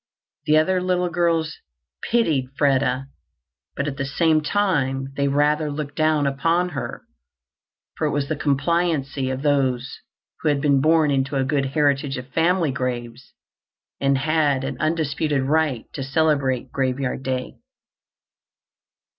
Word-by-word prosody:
The 155 0 +5
other 180 +4 +2
little 180 -1 0
girls 165 -2 0 0.5
pitied 160 - +2
Freda, 135 -2 +2 0.7
but 140 - -2
at 140 -1 -4
the 135 - -2
same 155 +2 +2
time 140 -7 0
they 140 -1 +1
rather 150 +2 +2
looked 145 -1 -5
down 155 -2 +2
upon 165 +6 +1
her 145 -6 -6 0.9
for - - 0
it - - -1
with 140 -1 -1
the 155 - -1
complacency 145 -2 0
of 130 +1 -4
those 135 -3 0 0.4
who 155 - +1
had 145 -1 +1
been 140 -1 +3
born 155 0 +3
into 140 +1 0
a 135 - +2
good 135 0 0
heritage 140 -1 +1
of 125 0 -7
family 170 -2 +2
graves 125 -1 -5 0.6
and 140 0 +2
had 145 -1 +1
an 135 0 -3
undisputed 155 -3 0
right 145 -3 0
to 140 - -5
celebrate 135 -2 0
Graveyard 130 0 -1
Day. 130 -1 -4
145 Hz, 140 wpm, -22 LUFS, 135-155 Hz, 0.9 s, The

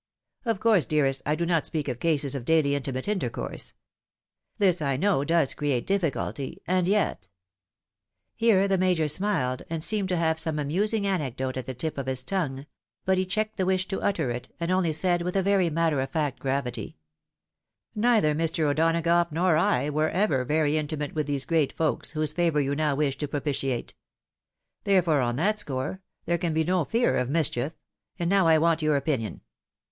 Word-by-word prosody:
Of 225 -4 0
coiirse, 220 -7 +3
dearrat, 135 -3 +1
I 150 - +2
do 170 +2 -1
not 170 -3 +1
speak 155 -3 -3
of 125 -2 -3
cases 145 -4 +1
of 135 -3 -3
daily 155 0 +2
intimate 130 -2 -3
intercourse. 210 -2 -2 0.8
This, 185 -6 +3
I 140 -3 0
know, 185 -3 +2
does 165 -2 +2
create 140 -5 -1
difficulty 165 -7 -2
— - - -51
and 180 0 +1
yet 190 - 0 0.4
— 100 +2 -66
" - - -63 0.3
Here 205 -4 +3
the 195 -1 +1
Major 180 -4 +2
smiled, 150 -6 +1
and 165 -1 -3
seemed 205 -1 +1
to 180 - 0
have 160 -1 +1
some 160 -1 0
amusing 200 +9 +1
anecdote 130 -9 -2
at 130 -2 -5
the 130 - -5
tip 155 +3 -3
of 135 - -5
his 130 -1 0
tongue; 140 -5 -3 0.4
but 190 0 +2
he 185 - -1
checked 215 +2 -2
the 190 - 0
wish 185 0 +1
to 195 - -3
utter 160 -10 0
it, 120 0 -6
and 170 +1 -1
only 185 -3 +2
said, 175 +3 +2
with 180 +2 -3
very 195 -2 +2
matter 160 -3 +1
of 135 - -3
faot 145 -5 -1
gravity, 130 -2 -3 0.5
" - - -61
Neither 215 -8 +3
Mr. 160 +1 0
O'Donagough 165 +3 +2
nor 170 +2 +2
I 160 -3 +1
were 155 +1 +1
ever 170 -9 +1
very 155 +2 +1
intimate 150 -1 -4
with 150 -2 -2
these 140 -2 0
great 160 -4 +1
folks, 160 0 -1
whose 155 -1 -1
favour 165 -3 +1
you 140 0 0
now 150 -1 0
wish 140 -2 -1
to 150 - -2
propitiate; 135 -3 -3 0.9
therefore, 175 -7 +3
on 120 -1 0
that 210 +9 +1
score, 145 +2 -3 0.2
there 170 0 0
can 170 -3 -1
be 160 - +2
no 180 -1 +1
fear 235 - +1
of 125 0 -2
mischief 150 -2 0 0.2
— 105 - -42
^and 170 0 0
now 195 -3 +3
I 160 -1 +6
want 165 +1 +2
your 155 -1 +2
opinion. 135 -6 -2
160 Hz, 195 wpm, -26 LUFS, 140-185 Hz, 0.9 s, I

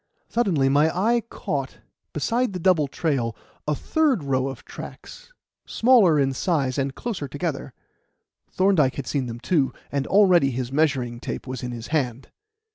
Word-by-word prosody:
Suddenly 185 - +2
my 145 +3 +4
eye 225 +8 +1
caught, - - -4 0.3
beside 240 -2 0
the 180 - -4
double 165 -5 +3
trail, 135 -7 -1 0.3
a 150 - +1
third 290 - +1
row 135 -1 0
of 135 - -8
tracks, - - -10 0.4
smaller 225 -10 +5
in 135 -1 +1
size 140 -3 0
and 135 0 -2
closer 200 -12 -4
together. 145 -1 -4 0.8
Thorndyke 185 -9 +2
had 140 - -5
seen 135 -4 -2
them, 115 0 -6
too, 140 0 +1 0.2
and 140 -1 -1
already 185 -8 +5
his 130 -1 -4
measuring 135 -5 0
tape - - -5
was 130 -2 -5
in 125 - -4
his 115 -1 -7
hand. 135 -5 -1
145 Hz, 155 wpm, -24 LUFS, 130-185 Hz, 0.8 s, smaller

